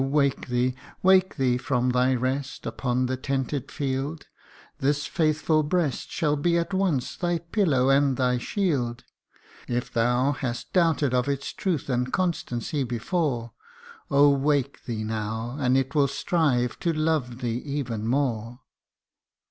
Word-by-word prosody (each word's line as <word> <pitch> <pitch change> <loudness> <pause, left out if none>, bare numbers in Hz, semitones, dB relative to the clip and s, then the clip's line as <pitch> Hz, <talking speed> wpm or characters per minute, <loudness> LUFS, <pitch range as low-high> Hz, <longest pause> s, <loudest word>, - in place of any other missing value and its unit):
wake 140 0 +1
thee 125 0 +1 0.3
wake 190 0 +5
thee 125 -3 +1
from 125 -1 0
thy 125 +1 +3
rest 130 +2 -2
upon 125 -1 -1
the 130 +1 -1
tented 135 +1 -2
field: 140 +2 -3 0.5
This 145 +2 +1
faithful 155 -1 +1
breast 150 -2 -1
shall 150 -2 0
be 170 +4 +1
at 170 +3 -2
once 185 -9 0
thy 175 -1 0
pillow 165 - +1
and 140 -1 +3
thy 125 -2 +2
shield; 125 - -1 0.6
If 120 0 -2
thou 125 +4 +2
hast 125 -4 -4
doubted 165 -7 +2
of 125 +2 +1
its 140 -1 -2
truth 175 -8 -2
and 125 -1 -1
constancy 150 -6 -1
before, 120 - -2 0.6
Oh! 140 +1 +6
wake 140 -1 0
thee 115 -3 -3
now, 110 +2 -3
and 130 -1 +3
it 135 +1 -1
will 145 -2 +4
strive 135 -4 0
to 170 - +1
love 155 -6 -1
thee 120 -1 -1
even 125 -6 -3
more. 120 -2 -1
135 Hz, 140 wpm, -26 LUFS, 125-150 Hz, 0.6 s, Oh